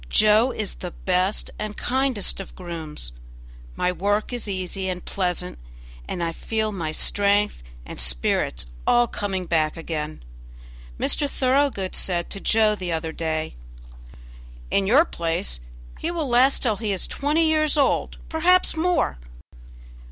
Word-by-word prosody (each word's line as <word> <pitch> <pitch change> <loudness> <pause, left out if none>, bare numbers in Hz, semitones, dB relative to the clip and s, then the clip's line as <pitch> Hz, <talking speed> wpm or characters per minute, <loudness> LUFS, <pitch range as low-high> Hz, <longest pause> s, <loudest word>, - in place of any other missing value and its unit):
Joe 215 +3 +5
is 215 -5 -3
the 180 - -6
best 185 +3 -1
and 215 0 -4
kindest 260 -7 0
of 195 - -8
grooms. 160 - -6 0.6
My 180 - +1
work 205 +6 0
is 240 -3 -2
easy 190 0 -2
and 180 -1 -4
pleasant, 180 - -2 0.5
and 175 - -3
I 165 - 0
feel 220 +5 -2
my 165 -6 -3
strength 205 - +2 0.2
and - - -8
spirits - - +1 0.2
all 240 0 +5
coming 195 -5 -3
back 160 -2 +1
again. 155 - -4 0.8
Mr. 290 - +3
Thoroughgood 260 -8 +1
said 175 -2 -1
to 200 - -4
Joe 215 +1 +3
the 185 -4 -4
other 160 0 -2
day: 160 -1 -2 1.2
"In 195 -1 +2
your 280 +10 +6
place 165 - -2 0.4
he 325 - -2
will 335 -4 -2
last 255 +3 +4
till 220 -5 +2
he 215 -1 -2
is 190 - -1
twenty 300 +3 +1
years 310 -1 +3
old 280 - +2
perhaps 350 +3 +3
more." 335 - +1
200 Hz, 140 wpm, -24 LUFS, 170-250 Hz, 1.2 s, your